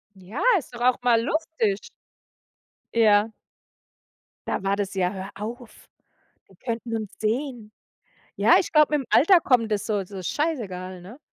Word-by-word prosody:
Ja, 190 +7 -8 0.2
ist 265 -6 -10
doch 240 - -8
auch 250 0 +2
mal 235 -2 +4
lustig. 270 -8 -1 1.1
Ja. 215 -1 +4 1.2
Da - - -1
war 195 +1 0
das: 200 -1 -3
„Ja, 185 0 0
hör 190 0 -7
auf. 230 +3 -9 0.6
Die 190 - -20
könnten 230 +2 -4
uns 215 -3 -7
sehen.“ 230 -1 -3 0.6
Ja, - - +5
ich - - -2
glaube, 305 -1 +4
mit'm 270 - -3
Alter 355 +4 +6
kommt 230 -6 +2
das 205 -2 -1
so 205 -3 -1
so 190 0 -9
scheißegal, 185 - -3
ne? 205 +10 -12
220 Hz, 150 wpm, -24 LUFS, 195-250 Hz, 1.2 s, Alter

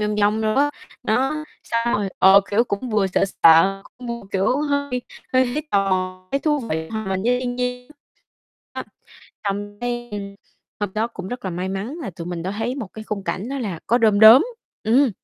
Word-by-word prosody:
vòng 210 0 -1
vòng 210 +2 +2
đồ 215 0 +1
á, 290 +2 +3 0.3
đó, 270 +7 0 0.2
xong 230 0 0
rồi, 205 -1 0
ờ, 195 +1 +8
kiểu, 225 +4 +3
cũng 230 +3 -4
vừa 210 -2 +2
sợ 190 - +1 0.2
sợ, 180 +4 +6 0.2
cũng 245 - -8
vừa, 235 0 -4
kiểu, 195 +7 +2
hơi 285 -4 -1 0.3
hơi 255 0 +5
thấy 305 - -1
tò 195 -1 +2
mò, 185 0 -2
thấy 275 - +2
thú 300 -2 +1
vị 160 - -3
hòa 220 -2 -4
mình 190 0 -1
với 245 +3 +2
thiên 245 -1 -3
nhiên. 250 +2 -3 0.8
Đó, - - -3 0.6
xong 205 +1 -3
cái 240 0 -3
đêm 200 -1 -5 0.5
hôm 205 -2 -2
đó 220 +2 +1
cũng 190 -5 -8
rất 245 -2 -6
là 190 - -2
may 180 +2 -3
mắn 200 - -4
là 195 - -4
tụi 170 0 -8
mình 175 -2 -4
đã 185 - -3
thấy 240 +3 -1
một 235 -9 -5
cái 215 0 -8
khung 200 -3 -4
cảnh 205 +6 -3
đó 275 - -3
là 200 -10 -3
có 240 +3 +3
đom 215 -3 +3
đóm, 225 +7 +10 0.4
ừm. 250 +3 +4
215 Hz, 215 wpm, -22 LUFS, 195-250 Hz, 0.8 s, đóm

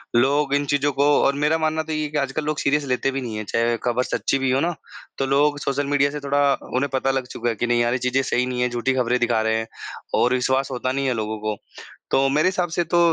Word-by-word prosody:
लोग 140 +3 +2
इन 145 0 0
चीज़ों 145 +1 +2
को 145 +1 +4
और 140 - +3
मेरा 155 +2 +3
मानना 160 0 0
तो 160 - -5
ये 155 - -1
ही 155 - -1
है 150 - -3
कि 150 - -2
आजकल 140 +2 -1
लोग 155 0 -1
सीरियस 145 +1 +1
लेते 130 +1 0
भी 135 0 -3
नहीं 115 -3 -5
हैं। 110 - -5
चाहे 115 +3 0
ख़बर 125 +1 +1
सच्ची 135 - -1
भी 135 -1 +1
हो 130 - +2
ना, 175 +1 0 0.4
तो 135 - 0
लोग 145 +2 +2
सोशल 140 +1 -1
मीडिया 140 0 +2
से 150 - -5
थोड़ा 140 0 +2 0.2
उन्हें 140 +3 +1
पता 135 0 +1
लग 135 -1 -2
चुका 120 -1 -3
है 115 - -2
कि 120 +4 -2
नहीं 120 0 +2
यार 120 0 +1
ये 130 - +1
चीज़ें 125 +2 +1
सही 125 0 0
नहीं 125 -1 -3
हैं, 125 - +2
झूठी 120 +2 -1
ख़बरें 125 -1 +1
दिखा 120 -2 +1
रहे 110 0 +1
हैं 110 0 -3 0.5
और 125 +1 +3
विश्वास 130 +1 0
होता 130 0 -2
नहीं 135 +1 -1
है 130 - +1
लोगों 110 -1 -3
को। 105 -1 -3 0.5
तो 135 0 +3
मेरे 150 +6 +3
हिसाब 180 -1 -1
से 175 - +2
तो 175 - +4
135 Hz, 280 wpm, -22 LUFS, 125-145 Hz, 0.5 s, को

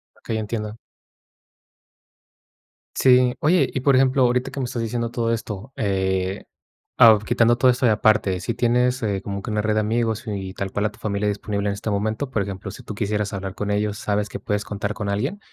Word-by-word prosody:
Okey, 110 - -4
entiendo. 110 0 -4 2.2
Sí, 125 -1 +5
oye, 170 +4 +3
y, - - -1
por 135 +1 +3
ejemplo, 130 0 +4
ahorita 125 +2 +1
que 140 - -6
me 130 - -1
estás 120 -1 -3
diciendo 115 +1 -2
todo 115 -1 -1
esto, 110 +1 -4
eh, 95 -2 -1 0.5
ao 110 -2 +8
quitando 120 +2 +2
todo 130 0 +5
esto, 125 +1 0
y - - +5
aparte, 105 -3 +2
si 115 - -2
tienes, 125 +2 +1
eh, 100 -3 -1
como 100 -1 -4
que 105 - -5
una 105 0 0
red 110 0 0
de - - +3
amigos, 110 +1 0
y 95 -3 -4
tal 95 0 -4
cual 105 +1 -1
a 105 - 0
tu - - -19
familia 105 -1 -1
disponible 100 0 -2
en - - -1
este 105 +2 -4
momento, 110 +6 -1
por 110 -6 -1
ejemplo, 100 0 -5
si - - -11
tú 105 - -7
quisieras 105 -1 -1
hablar 95 -1 -5
con 105 0 -3
ellos, 105 0 0
¿sabes 105 0 -1
que - - -7
puedes 105 -3 -2
contar 105 0 -3
con 105 -2 -5
alguien? 105 - -2
110 Hz, 210 wpm, -23 LUFS, 100-120 Hz, 2.2 s, ao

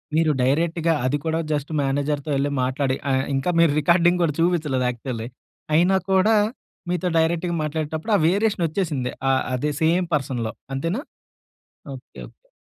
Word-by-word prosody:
మీరు 160 -1 +3
డైరెక్ట్‌గా. 165 +4 +1
అది 140 +3 +1
కూడా 160 0 0
జస్ట్ 145 0 -2
మేనేజర్‌తో 145 +2 -1
యెళ్లి 140 +1 0
మాట్లాడి 130 +1 0 0.2
ఆహ్, 130 0 +2
ఇంకా 135 +7 0
మీరు 170 -3 +5
రికార్డింగ్ 175 +3 +3
గూడా 150 -3 0
చూపిచ్చలేదు 155 -7 +1
యాక్చువల్లీ. 120 -1 -5 0.5
అయినా 180 +4 +4 0.2
కూడా 190 +4 +4 0.6
మీతో 180 0 -1
డైరెక్ట్‌గా 170 +2 0
మాట్లాడేటప్పుడు, 155 +5 -3
ఆ - - -1
వేరియేషనొచ్చేసింది. 170 - 0 0.2
ఆహ్, 130 0 +2
అదే 150 +4 -1
సేమ్ 170 +3 +2
పర్సన్‌లో. 125 -5 -2 0.2
అంతేనా? 165 - -2 0.9
ఓకే. 130 - -14
ఓకే. - - -32
155 Hz, 140 wpm, -23 LUFS, 135-170 Hz, 0.9 s, మీరు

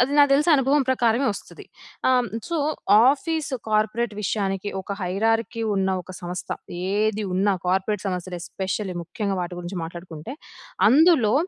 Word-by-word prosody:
అది 250 +3 +2
నాకు 285 -1 +6
తెలిసి 300 +4 +3
అనుభవం 275 +1 +3
ప్రకారమే 245 +1 +2
వస్తది. 200 - -11 0.4
ఆహ్, 255 - +5
హ్మ్, 245 -1 -1 0.2
సో, 340 -1 -1 0.5
ఆఫీసు 290 -1 -2
కార్పొరేట్ 215 +1 +1
విషయానికి 195 0 -1
ఒక 200 +1 -6
హైరార్కీ 225 +5 0
ఉన్న 190 0 +1
ఒక 185 +2 -11
సంస్థ, 175 +1 -5 0.4
ఏది 215 +1 +1
ఉన్నా 195 +2 +2
కార్పొరేట్ 190 +2 0
సంస్థలు 180 -1 -4
ఎస్పెషల్లీ 190 0 -4
ముఖ్యంగా 200 +3 -3
వాటి 175 0 -6
గురించి 175 +1 -5
మాట్లాడుకుంటే, 170 - -8 0.6
అందులో 285 -6 +5
210 Hz, 140 wpm, -24 LUFS, 185-250 Hz, 0.6 s, నాకు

